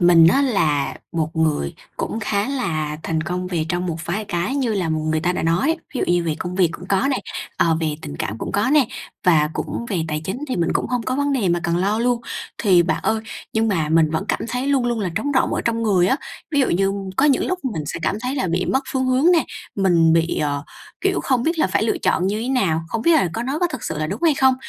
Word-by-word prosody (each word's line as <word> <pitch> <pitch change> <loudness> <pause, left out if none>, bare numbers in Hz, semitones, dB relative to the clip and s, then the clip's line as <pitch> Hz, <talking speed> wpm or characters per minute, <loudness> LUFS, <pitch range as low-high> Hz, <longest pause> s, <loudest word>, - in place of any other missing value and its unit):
mình 175 -2 +7
á, 275 - +3
là 155 - +1 0.2
một 160 -1 -2
người 155 - 0 0.2
cũng 225 - -3
khá 205 +1 0
là 155 - -2
thành 160 -1 -1
công 180 +3 -3
về 170 -4 -2
trong 175 +2 -1
một 165 -3 -2
vài 195 +6 -2
cái 185 +3 -2
như 255 -6 0
là 185 -5 -1
người 155 0 0
ta 180 +2 +1
đã - - -2
nói. 175 - +2 0.2
Ví - - -2
dụ - - +2
như 175 -1 +2
về 160 -2 0
công 180 0 -4
việc 185 -2 +3
cũng 180 +3 -9
có 200 +8 +2
nè, 265 - +1 0.4
ờ, 165 -1 +3
về 155 -2 -1
tình 70 - -6
cảm 105 +8 -3
cũng - - -5
có 205 +6 +1
nè, 290 -4 +5 0.4
và 155 -4 +4
cũng 235 - -4
về 190 -5 -1
tài 155 0 -2
chính 190 +8 -3
thì 255 - -1
mình 170 -2 +1
cũng - - 0
hông 245 -1 -1
có 255 - -2
vấn 285 0 +1
đề 235 -9 +1
mà 175 0 +1
cần 170 -2 0
lo 200 +4 +1
luôn. 240 0 +1 0.4
Thì 185 -5 +5
bạn 165 -2 -1
ơi, 220 - +1 0.3
nhưng 225 0 +1
mà 165 -7 0
mình 160 -1 +4
vẫn 160 +5 -1
cảm - - 0
thấy 250 +3 -2
luôn 275 -3 +2
luôn 240 -2 0
là 185 -4 -1
trống 285 - -1
rỗng 260 - +2
ở - - 0
trong 230 0 0
người 190 -5 +3
á. 195 - +2 0.3
Ví 290 -3 +2
dụ 265 - +3
như 195 +3 +2 0.2
có 270 - +3
những 285 -3 +3
lúc 370 - -1
mình 160 - -3
sẽ - - -4
cảm 175 - 0
thấy 255 +3 -2
là 260 -9 0
bị 175 +2 0
mất 265 +1 +1
phương 260 -1 0
hướng 260 +7 +4
nè, 335 -3 +3 0.3
mình 170 -4 +4
bị, 165 +1 +2
ờ, 145 -1 -1 0.4
kiểu, 385 -1 +1
không 255 -3 +1
biết 330 +5 0
là - - +4
phải 190 - 0
lựa 220 - 0
chọn 180 - +1
như 205 +3 -1
thế 245 - -3
nào, 190 -12 +1
không 225 +6 -2
biết 335 - +4
là 305 - +4
có 230 - -3
nó 270 +5 -2
có 355 - +2
thực 260 - -6
sự - - -3
là 155 - -1
đúng 195 - -5
hay 325 -3 +4
không. 265 -1 +4
190 Hz, 270 wpm, -21 LUFS, 165-255 Hz, 0.4 s, mình